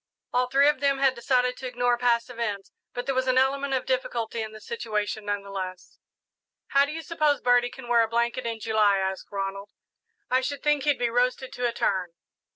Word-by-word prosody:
All 250 0 +2
three 275 +3 +4
of 295 -2 +3
them 280 0 +2
had 270 -1 +3
decided 250 0 +1
to 260 - -5
ignore 245 -1 +1
past 240 -1 +1
events, 215 -5 -4 0.2
but 245 - -5
there 270 - 0
was 260 0 0
an 255 0 +3
element 270 +1 +2
of 255 - -2
difficulty 235 -3 -2
in 220 0 -5
the 215 - -11
situation, 215 -2 -3
none 205 -1 -2
the 200 - -10
less. 185 -2 -6 0.7
"How 280 0 +4
do 285 - -6
you 325 +1 -5
suppose 305 -3 +1
Birdie 245 0 +3
can 260 -1 -11
wear 235 -1 +4
a 225 - +2
blanket 235 +1 -1
in 230 -1 -3
July?" 215 -2 +3
asked 190 0 -2
Ronald. 195 0 -4 0.6
"I 255 +1 +2
should 280 +1 -4
think 295 -2 +2
he'd 290 -2 +3
be 240 -1 0
roasted 250 +2 0
to 245 0 -1
a - - -1
turn." 185 -6 -1
245 Hz, 215 wpm, -26 LUFS, 215-265 Hz, 0.7 s, three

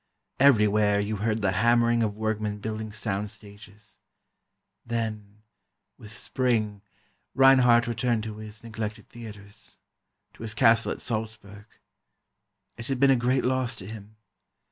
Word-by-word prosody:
Everywhere 105 -6 +4
you 105 +1 -2
heard 110 +1 -1
the 95 - +2
hammering 120 +4 +3
of 105 -2 -1
workmen 110 -1 -2
building 110 +1 -5
sound 105 -1 -3
stages. 105 +1 -14 0.8
Then—with 110 -1 -8
Spring—Reinhardt 120 +3 +1
returned 120 -1 -1
to 110 -1 -6
his 110 0 -9
neglected 110 -1 -6
theatres, 105 -4 -11 0.6
to - - -16
his 110 -1 -5
castle 115 -1 +4
at - - -6
Salzburg. 110 -3 -5 1.1
It 115 - -7
had 135 -2 -2
been 140 0 +5
a - - +5
great 125 +2 +1
loss 130 -1 0
to 95 - -9
him. 105 0 -10
110 Hz, 120 wpm, -26 LUFS, 105-120 Hz, 1.1 s, been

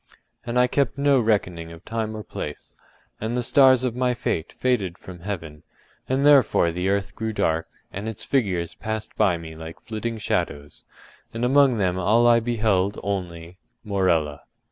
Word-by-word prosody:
And 120 +1 -1
I 125 - +6
kept 135 +1 0
no 140 -1 +4
reckoning 90 -7 0
of 85 +3 -13
time 110 -1 -3
or 105 - -6
place, 75 -6 -7 0.4
and 115 +3 -2
the 125 - 0
stars 130 -1 +5
of 125 -2 -1
my 125 0 +1
fate 80 -8 -2
faded 105 -9 -1
from 90 -1 -11
heaven, 85 -6 -6 0.5
and 135 +2 +1
therefore 135 -12 +5
the 90 +3 -1
earth 100 0 -1
grew 110 0 -3
dark, 80 -6 0 0.3
and 105 +3 -4
its 110 - -6
figures 95 -11 0
passed 110 -1 -5
by 100 -5 +3
me 80 -1 -9
like 80 +1 -9
flitting 115 +1 -4
shadows, 75 -8 -3 0.5
and 115 +2 0
among 135 -1 +4
them 95 -3 0
all 110 +6 +3
I 120 -1 +6
beheld 110 -4 0
only—Morella. 90 -3 -2
105 Hz, 165 wpm, -24 LUFS, 85-120 Hz, 0.5 s, I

